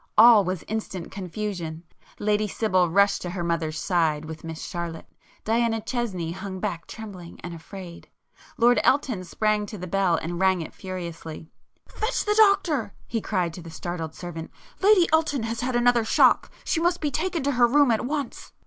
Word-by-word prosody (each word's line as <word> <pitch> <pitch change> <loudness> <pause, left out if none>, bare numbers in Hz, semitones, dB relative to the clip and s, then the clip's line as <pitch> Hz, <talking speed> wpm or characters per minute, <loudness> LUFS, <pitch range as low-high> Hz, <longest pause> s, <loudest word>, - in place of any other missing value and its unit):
All 225 -1 +9
was 185 -1 -3
instant 205 -5 -5
confusion. 180 -4 -5 0.3
Lady 210 0 +1
Sibyl 185 -4 +1
rushed 200 +4 +3
to 180 - -4
her 175 0 -3
mother's 165 -2 -1
side, 160 -2 +1
with 160 0 -8
Miss 160 -1 -6
Charlotte,—Diana 220 +7 -3
Chesney 205 -10 -3
hung 190 +1 -6
back 180 -5 -3
trembling 190 -6 -9
and 175 - -6
afraid,—Lord 185 +7 -2
Elton 255 -8 +2
sprang 210 +3 0
to 210 - -7
the 185 - -6
bell 185 -1 +2
and 170 +2 -3
rang 190 -2 +3
it 160 - -7
furiously. 170 -4 -7 0.4
"Fetch 440 +3 -2
the 420 - +2
doctor!" 380 - +3
he 225 -1 -2
cried 180 -6 -1
to 175 - -8
the 165 - -10
startled 165 -1 -5
servant—"Lady 260 - +1
Elton 305 -6 +2
has 225 +1 -3
had 250 0 -1
another 240 -1 +4
shock! 220 - +4
She 320 - 0
must 345 +1 +1
be 295 -2 -1
taken 335 0 -1
to 285 - +1
her 245 -2 +4
room 285 +1 +4
at 220 - +1
once!" 280 -1 -4
200 Hz, 165 wpm, -25 LUFS, 170-240 Hz, 0.4 s, All